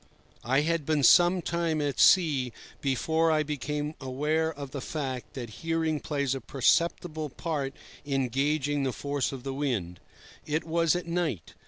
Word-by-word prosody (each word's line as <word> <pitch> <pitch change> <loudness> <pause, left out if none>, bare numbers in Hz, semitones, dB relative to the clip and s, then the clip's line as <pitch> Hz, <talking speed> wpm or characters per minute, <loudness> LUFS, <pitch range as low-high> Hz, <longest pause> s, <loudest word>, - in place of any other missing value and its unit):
I 135 +4 +2
had 165 +1 0
been 150 -1 +1
some 175 +6 +6
time 170 -2 0
at 145 -2 -2
sea 145 -10 +4 0.3
before 160 +4 +1
I 155 -1 +2
became 150 0 -3
aware 150 +5 0
of 140 -3 -8
the 140 - -5
fact 130 -4 -5
that 120 -4 -6
hearing 165 -1 0
plays 140 -3 -1
a 135 - -4
perceptible 155 +5 +1
part 140 -1 -3 0.3
in 135 -2 0
gauging 145 +2 0
the 130 -2 -1
force 140 0 -2
of 135 -3 -7
the 135 -1 -3
wind. 115 -12 -2 0.4
It 155 +1 -1
was 165 0 +2
at 180 - -3
night. 170 - -2
145 Hz, 160 wpm, -28 LUFS, 135-160 Hz, 0.4 s, some